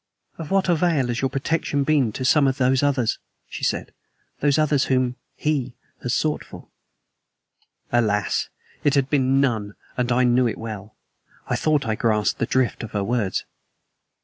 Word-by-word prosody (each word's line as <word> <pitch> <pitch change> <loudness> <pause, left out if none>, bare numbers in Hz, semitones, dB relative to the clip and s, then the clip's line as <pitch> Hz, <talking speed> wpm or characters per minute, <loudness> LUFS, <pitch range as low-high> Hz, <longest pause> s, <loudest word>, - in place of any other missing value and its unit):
"Of 160 - -6
what 195 -1 +2
avail 165 -6 +2
has 120 - -1
your 135 - +1
protection 145 +1 -1
been 140 -6 +2
to 130 - -4
some 140 +1 +4
of 135 0 0
those 130 0 +3
others," 140 -5 +1 0.3
she - - -8
said; - - -1 0.5
"those 145 -1 +2
others 150 -3 +2
whom 130 -1 +1 0.2
HE 135 -5 -1 0.3
has 125 - -2
sought 150 +4 0
for?" - - -13 1.2
Alas! 105 -4 +1 0.3
it 145 - +3
had 135 -1 +1
been 135 -2 +3
of - - +4
none, 110 -7 0 0.2
and 125 0 0
I 125 +1 +3
knew 125 0 +3
it 110 - -3
well. 110 -2 -7 0.5
I - - 0
thought 155 -2 +1
I 110 - 0
grasped 110 -3 +1
the - - 0
drift 130 -2 +1
of 115 - -7
her 100 -1 0
words. 110 -2 -1
130 Hz, 175 wpm, -23 LUFS, 115-145 Hz, 1.2 s, some